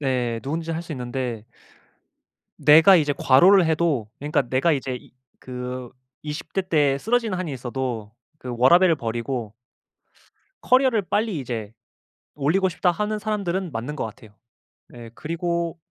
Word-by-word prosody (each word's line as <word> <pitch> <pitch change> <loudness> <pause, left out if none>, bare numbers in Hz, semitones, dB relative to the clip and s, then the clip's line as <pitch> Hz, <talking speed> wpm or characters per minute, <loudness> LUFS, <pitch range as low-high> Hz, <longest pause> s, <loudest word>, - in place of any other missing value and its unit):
네. 125 -4 -1
누구든지 160 +4 -3
할 165 +1 -3
수 170 - -8
있는데. 125 -3 -4 1.1
내가 160 +6 +7
이제 150 -3 +2
과로를 175 +7 +5
해도 155 -8 0
그니까 150 0 0
내가 135 +6 +2
이제 130 -3 -2
이 - - -16 0.3
그 125 -1 -6 0.3
20 150 +1 -7
대 195 - +1
때 145 -6 +2
쓰러지는 225 - 0
한이 170 -6 -4
있어도 120 -4 -4 0.3
그 125 -1 -6
워라밸을 170 +7 +5
버리고 115 -2 -4 1.1
커리어를 255 -4 +3
빨리 205 -2 -1
이제 115 -5 -5 0.6
올리고 175 +7 +1
싶다 180 0 +1
하는 210 +3 -2
사람들은 195 -4 -2
맞는 125 +6 -5
것 - - -3
같아요. 110 -1 -11 0.6
예 120 -2 -10
그리고 170 +1 -3
150 Hz, 285 characters per minute, -23 LUFS, 125-175 Hz, 1.1 s, 내가